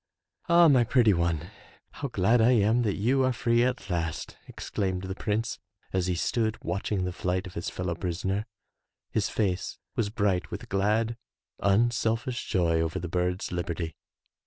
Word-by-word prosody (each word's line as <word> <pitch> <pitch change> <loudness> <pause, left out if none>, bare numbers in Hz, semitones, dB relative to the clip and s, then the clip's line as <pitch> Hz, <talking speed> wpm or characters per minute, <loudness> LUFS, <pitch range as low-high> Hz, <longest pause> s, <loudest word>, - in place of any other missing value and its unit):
"Ah, 170 0 +7
my 130 -5 +5
pretty 115 -3 +4
one, 85 -3 -1 0.4
how 140 - -4
glad 115 0 +3
I 120 +3 +5
am 110 +1 +3
that 105 -4 0
you 130 +6 +2
are 130 - +3
free 120 0 +2
at 125 -3 -1
last, 85 -4 -2
exclaimed 95 -2 -3
the 95 0 -4
prince 115 +4 -2 0.3
as 95 -1 +1
he 90 - 0
stood 110 +5 0
watching 95 +2 -1
the 90 - -3
flight 90 +1 -1
of 90 - -9
his 85 - -3
fel 90 - -5
low 85 - 0
prisoner. 95 +5 -2 0.6
His - - 0
face 95 -4 -1 0.2
was 105 -3 0
bright 100 -5 0
with - - -7
glad, 110 +4 +1 0.4
unselfish 115 +3 +1
joy 85 -5 +2
over 80 +2 -1
the 90 -1 -3
bird's 90 +1 -1
liberty. 85 -2 -3
100 Hz, 165 wpm, -28 LUFS, 90-115 Hz, 0.6 s, Ah